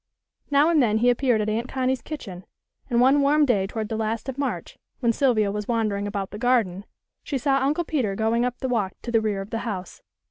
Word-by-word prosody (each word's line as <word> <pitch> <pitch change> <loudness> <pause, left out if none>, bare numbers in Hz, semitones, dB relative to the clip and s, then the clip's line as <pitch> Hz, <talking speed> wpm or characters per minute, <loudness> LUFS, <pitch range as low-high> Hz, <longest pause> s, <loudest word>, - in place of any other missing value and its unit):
Now 290 +2 +4
and 325 -4 +4
then 220 -3 +2
he 245 +2 +4
appeared 245 -3 +1
at 210 - -1
Aunt 230 +3 -1
Connie's 260 0 -1
kitchen, 195 - -7 0.5
and 240 -2 +2
one 270 +3 +5
warm 295 +2 +4
day 205 -8 +1
toward 215 +1 -4
the 220 - -3
last 220 +2 -2
of 265 - -4
March, 280 - -3 0.2
when 235 -3 +2
Sylvia 220 -6 +2
was 210 0 -4
wandering 215 -4 0
about 200 -2 -4
the 210 - -7
garden, 220 -6 +1 0.4
she 285 - -2
saw 275 0 +2
Uncle 290 +6 +1
Peter 255 -12 -1
going 225 +3 +1
up 245 0 -2
the 260 - -3
walk 215 -7 0
to 240 - -4
the 225 -1 +3
rear 210 -3 -1
of 195 - -9
the 225 - -2
house. 195 -6 -6
235 Hz, 225 wpm, -24 LUFS, 210-265 Hz, 0.5 s, one